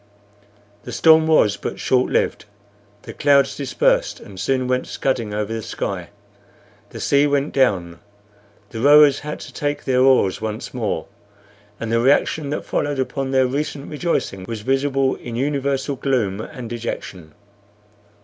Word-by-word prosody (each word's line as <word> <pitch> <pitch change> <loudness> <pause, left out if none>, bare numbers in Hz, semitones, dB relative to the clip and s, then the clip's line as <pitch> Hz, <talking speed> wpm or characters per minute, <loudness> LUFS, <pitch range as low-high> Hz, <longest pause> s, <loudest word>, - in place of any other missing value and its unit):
The 125 - -9
storm 160 +5 +5
was 110 -10 +3
but - - -5
short 130 -1 +1
lived; - - 0 0.6
the - - -9
clouds 140 -1 +3
dispersed, - - 0
and 100 -4 -12
soon 130 +5 0
went 125 0 -1
scudding 120 -5 -2
over 105 +1 -3
the 115 - -3
sky; - - -4 0.8
the - - -9
sea 140 +1 +3
went 145 0 0
down. 95 -10 +1 0.7
The 115 - -6
rowers 145 +2 +6
had 150 0 -6
to - - -10
take 145 0 -3
their 130 -1 +2
oars 130 -9 +3
once 110 0 -5
more, - - -2 0.7
and 115 -1 -4
the 115 - +2
reaction 140 +3 +2
that 150 - -3
followed 145 -1 -1
upon 135 +1 -2
their 130 -1 +3
recent 140 +2 -3
rejoicing 150 - -2
was 110 +1 -6
visible 135 +2 +1
in 120 -1 -8
universal 140 +1 -1
gloom 115 -7 -1
and 125 0 -8
dejection. 95 -8 -6
130 Hz, 150 wpm, -21 LUFS, 115-145 Hz, 0.8 s, rowers